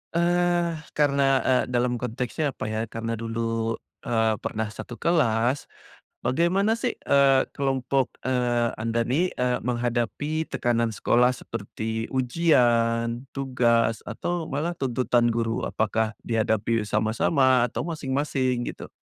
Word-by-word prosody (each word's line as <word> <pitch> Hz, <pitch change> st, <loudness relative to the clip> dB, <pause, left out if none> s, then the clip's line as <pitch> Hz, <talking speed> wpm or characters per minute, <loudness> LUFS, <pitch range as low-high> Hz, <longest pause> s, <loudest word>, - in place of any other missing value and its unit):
eee, 175 Hz, 0 st, +2 dB, 0.2 s
karena, 140 Hz, -2 st, +3 dB, 0.2 s
eee, 130 Hz, -1 st, +3 dB
dalam 125 Hz, 0 st, +1 dB
konteksnya 125 Hz, +5 st, -2 dB
apa -, -, -5 dB
ya, 110 Hz, +1 st, -2 dB
karena 115 Hz, 0 st, -3 dB
dulu, 115 Hz, 0 st, -2 dB, 0.3 s
eee, 110 Hz, -1 st, +2 dB
pernah 110 Hz, 0 st, -2 dB
1 120 Hz, -, -8 dB
kelas, 130 Hz, -6 st, +1 dB, 0.5 s
bagaimana 175 Hz, -, +2 dB
sih, 240 Hz, +1 st, -1 dB
eee, 135 Hz, -1 st, +4 dB
kelompok, 135 Hz, -2 st, 0 dB
eee, 120 Hz, -2 st, +1 dB
Anda 115 Hz, +1 st, -1 dB
nih, 170 Hz, +8 st, +1 dB
eee, 125 Hz, 0 st, 0 dB
menghadapi 125 Hz, +6 st, -1 dB
tekanan 115 Hz, -1 st, +1 dB
sekolah 125 Hz, +4 st, +3 dB
seperti 110 Hz, -1 st, -5 dB
ujian, 120 Hz, -4 st, +2 dB
tugas 120 Hz, -4 st, +1 dB
atau 175 Hz, -2 st, -3 dB
malah 160 Hz, +4 st, -3 dB
tuntutan 120 Hz, -2 st, +1 dB
guru, 115 Hz, 0 st, -1 dB
apakah 110 Hz, +1 st, 0 dB
dihadapi 110 Hz, -1 st, 0 dB
sama-sama 120 Hz, +4 st, +2 dB
atau 120 Hz, -, -3 dB
masing-masing 135 Hz, -4 st, -1 dB
gitu? -, -, -8 dB
125 Hz, 115 wpm, -25 LUFS, 115-140 Hz, 0.5 s, eee